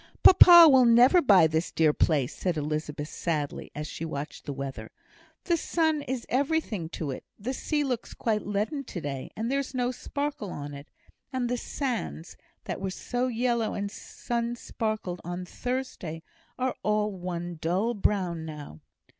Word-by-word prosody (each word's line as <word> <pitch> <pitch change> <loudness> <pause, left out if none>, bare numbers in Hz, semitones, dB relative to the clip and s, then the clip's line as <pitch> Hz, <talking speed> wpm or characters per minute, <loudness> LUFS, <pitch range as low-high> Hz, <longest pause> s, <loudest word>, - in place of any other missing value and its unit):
"Papa 350 -2 +10
will 265 -4 +6
never 245 +9 +6
buy 200 - +6
this 160 +2 0
dear 155 -2 +3
place," 145 -6 +1
said 180 -4 -1
Elizabeth, 150 0 -3
sadly, 150 -4 -3
as 150 +1 -4
she 155 - -6
watched 150 -2 -6
the - - -4
weather. 135 -1 -6 0.5
"The 340 -2 +1
sun 315 -2 +1
is 255 -3 -4
everything 260 - 0
to 150 -4 -3
it. 130 - -7
The 245 +6 -4
sea 295 +2 -1
looks 250 -4 -3
quite 215 -2 0
leaden 210 +8 -2
to 180 - -6
day, 140 -4 -5
and 225 +3 -2
there 275 - +2
is 275 -1 -5
no 245 0 +1
sparkle 285 -2 -4
on 145 -3 -6
it. 140 +1 -10 0.4
And 255 -2 -1
the 245 - +1
sands, 240 - -4 0.3
that - - -5
were 195 - -2
so 245 +6 -2
yellow 235 -2 0
and 200 0 -3
sun 235 +2 -4
speckled 215 -6 -4
on 175 +1 -5
Thursday, 220 -8 -4 0.3
are 255 0 -1
all 210 0 +1
one 175 -2 -5
dull 190 +8 +1
brown 185 -6 0
now." 150 - -8
210 Hz, 165 wpm, -27 LUFS, 160-255 Hz, 0.5 s, Papa